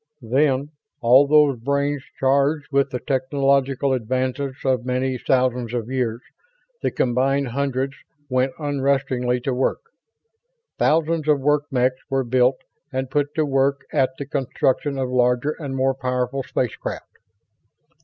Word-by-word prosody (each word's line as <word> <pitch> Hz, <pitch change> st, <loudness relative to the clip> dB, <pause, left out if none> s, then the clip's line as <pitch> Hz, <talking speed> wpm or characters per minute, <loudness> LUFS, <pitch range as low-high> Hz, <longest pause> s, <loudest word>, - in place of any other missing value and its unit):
Then, 135 Hz, +3 st, +1 dB, 0.3 s
all 130 Hz, +3 st, +6 dB
those 145 Hz, -4 st, +4 dB
brains 140 Hz, +2 st, -1 dB, 0.2 s
charged 140 Hz, +3 st, +2 dB
with 140 Hz, 0 st, +2 dB
the 125 Hz, -, -3 dB
technological 135 Hz, 0 st, +1 dB
advances 130 Hz, +3 st, -2 dB
of 130 Hz, -3 st, +1 dB
many 130 Hz, 0 st, -1 dB
thousands 125 Hz, -2 st, 0 dB
of 120 Hz, +1 st, -3 dB
years, 120 Hz, -3 st, -1 dB, 0.6 s
the -, -, +1 dB
combined 130 Hz, +2 st, +1 dB
hundreds 135 Hz, +1 st, -1 dB, 0.3 s
went 130 Hz, 0 st, 0 dB
unrestingly 135 Hz, -4 st, 0 dB
to 130 Hz, +1 st, -1 dB
work. 130 Hz, +1 st, 0 dB, 1.0 s
Thousands 160 Hz, 0 st, +2 dB
of 150 Hz, -2 st, +4 dB
work 145 Hz, +1 st, +2 dB
mechs 130 Hz, 0 st, +1 dB
were 135 Hz, -1 st, +1 dB
built 125 Hz, +1 st, +2 dB, 0.3 s
and 130 Hz, -1 st, -3 dB
put 145 Hz, +1 st, 0 dB
to 155 Hz, -, +2 dB
work 140 Hz, 0 st, +1 dB
at 135 Hz, -3 st, +3 dB
the 140 Hz, -, -5 dB
construction 135 Hz, 0 st, -1 dB
of 130 Hz, -1 st, -1 dB
larger 125 Hz, +3 st, +2 dB
and 140 Hz, -4 st, -5 dB
more 135 Hz, 0 st, +2 dB
powerful 125 Hz, 0 st, -2 dB
space 125 Hz, -2 st, -2 dB
craft. -, -, -7 dB
135 Hz, 135 wpm, -22 LUFS, 125-140 Hz, 1.0 s, all